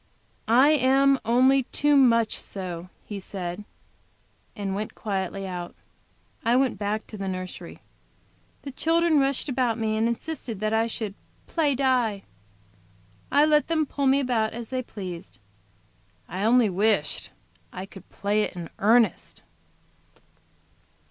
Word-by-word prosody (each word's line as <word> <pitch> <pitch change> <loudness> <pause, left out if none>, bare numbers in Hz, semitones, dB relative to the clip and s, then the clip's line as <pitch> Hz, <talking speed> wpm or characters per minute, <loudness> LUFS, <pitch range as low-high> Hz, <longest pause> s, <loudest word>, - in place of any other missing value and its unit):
"I 250 +6 +6
am 275 -1 +4
only 260 +3 +4
too 295 +3 +1
much 230 -5 +4
so," 180 -2 -6 0.2
he 205 -2 -6
said, 185 0 -5 0.9
and 200 -2 -3
went 210 +2 -4
quietly 195 -1 -3
out. 180 -2 -6 0.7
I 235 +1 +3
went 260 -1 +1
back 210 +1 -2
to 215 - -10
the 195 - -3
nursery. 185 -1 -6 0.8
The 275 - -6
children 325 +2 +2
rushed 275 +1 0
upon 245 -4 0
me, 220 -1 0
and 220 +1 +1
insisted 235 -3 -4
that 215 +1 -1
I 225 +1 +2
should 220 -3 -4 0.3
"play 300 -5 +1
die." 245 -6 +1 1.1
I 290 +2 +5
let 300 -1 +3
them 320 -2 +1
pull 280 -1 -1
me 270 +1 +4
about 240 -5 0
as 230 -1 -7
they 255 -1 -2
pleased. 185 -8 -8 0.9
I 190 +4 -3
only 240 0 +5
wished 200 -4 0 0.4
I 185 - -6
could 195 -1 -14
play 205 +2 0
it - - -2
in 170 -2 -7
earnest. 225 +3 +2
225 Hz, 135 wpm, -25 LUFS, 200-270 Hz, 1.1 s, I